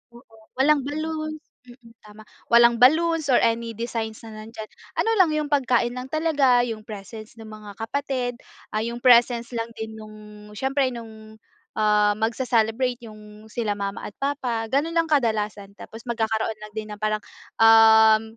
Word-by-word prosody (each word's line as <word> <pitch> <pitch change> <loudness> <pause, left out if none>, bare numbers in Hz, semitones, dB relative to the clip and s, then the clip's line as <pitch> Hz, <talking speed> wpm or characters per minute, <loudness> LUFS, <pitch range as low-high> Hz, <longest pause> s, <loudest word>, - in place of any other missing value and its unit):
Oo, 240 -2 -18 0.2
walang 290 +1 +4
balloons 310 +1 -4 0.3
mm, 240 -2 -16
tama. 210 +1 -14 0.3
Walang 235 0 +6
balloons 320 +3 +4
or 250 - +5
any 230 0 0
designs 225 -2 -4
na 225 - -10
nandiyan. 220 -1 -9 0.3
Ano 450 - +1
lang, 350 -4 +5
yung 300 -1 -2
pagkain 245 -3 +1
lang 250 +1 -6
talaga, 285 -6 +2
yung 220 -2 -5
presence 215 +2 -10
ng 220 - -10
mga 215 -1 -10
kapatid, 255 +1 -3 0.4
ah, 215 - 0
yung 235 +1 -5
presence 240 -1 +4
lang 230 0 -3
din 220 0 -6
nung 215 0 -11 0.4
siyempre 270 0 0
nung, 220 -2 -11 0.4
ah, 210 -1 +3
magse-celebrate, 235 +1 0
yung 215 0 -13
sila 215 -4 -2
mama 200 0 -4
at 205 - -12
papa, 255 -5 -2
ganun 315 +5 0
lang 330 -1 +1
kadalasan. 210 -7 -1
Tapos 225 +1 -11
magkakaroon 220 -1 -1
lang 215 -1 -11
din 215 0 -5
ng 210 - -12
parang, 215 0 -1 0.4
um, 220 -1 +7
230 Hz, 155 wpm, -23 LUFS, 220-260 Hz, 0.4 s, um